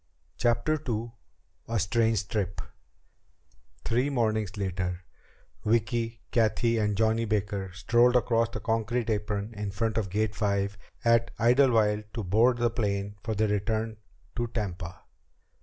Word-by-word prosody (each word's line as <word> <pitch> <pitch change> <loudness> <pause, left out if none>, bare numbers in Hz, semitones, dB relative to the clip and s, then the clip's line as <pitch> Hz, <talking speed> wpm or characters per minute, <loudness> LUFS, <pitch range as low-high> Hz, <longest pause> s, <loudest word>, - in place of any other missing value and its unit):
CHAPTER 120 +6 +1
II 115 +1 -2 0.6
A 115 - -1
Strange 110 +1 +1
Trip 100 -4 -2 1.3
Three 125 +5 +1
mornings 110 -6 0
later 90 -2 -2 0.6
Vicki, 115 +1 0
Cathy, 115 -1 +2
and 105 -2 0
Johnny 110 +1 +2
Baker 100 -2 -1
strolled 120 +5 +3
across 115 -1 +3
the 120 - -6
concrete 115 +1 0
apron 105 0 -2
in 105 -1 -4
front 110 +3 -1
of 100 -3 -3
Gate 105 +2 0
Five 100 -1 0 0.3
at 115 0 +4
Idlewild 115 -4 +4
to 115 - -2
board 115 +7 +3
the 120 -1 +1
ship 100 -3 -1
for 110 -2 -2
their 110 +1 +1
return 110 +2 0
run 110 - -13 0.4
to 120 0 0
Tampa. 90 -6 -5
110 Hz, 135 wpm, -28 LUFS, 105-115 Hz, 1.3 s, at